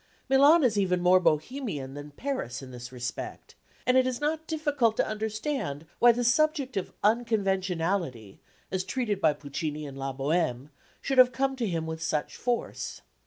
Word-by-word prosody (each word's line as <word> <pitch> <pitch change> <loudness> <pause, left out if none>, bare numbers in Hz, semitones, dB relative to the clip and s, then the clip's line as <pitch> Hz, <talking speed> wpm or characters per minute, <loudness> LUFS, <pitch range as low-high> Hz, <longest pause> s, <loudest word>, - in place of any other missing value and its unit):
Milan 285 +5 +6
is 220 -5 +3
even 180 -2 +2
more 180 +1 +5
Bohemian 165 - -1
than 145 +1 -8
Paris 145 - -4
in 130 - -10
this 120 0 -8
respect, 120 -2 -6 0.3
and 250 - +3
it 255 0 +4
is 255 -2 -2
not 310 +2 -1
difficult 290 -8 +1
to - - +3
understand 215 - -3
why 240 - +8
the 245 +1 -1
subject 275 +1 +2
of 195 - -2
unconventionality, 190 - 0 0.3
as 185 -1 -1
treated 215 -4 -2
by 155 -3 +4
Puccini 150 +1 -5
in 140 -2 -8
La 135 0 -3
Bohème, 140 -1 -1 0.3
should 270 -1 +1
have 250 0 +8
come 270 +2 0
to 240 -4 -1
him 165 -3 -2
with 160 0 -5
such 150 -2 -2
force. 245 -1 -3
195 Hz, 165 wpm, -28 LUFS, -, 0.3 s, why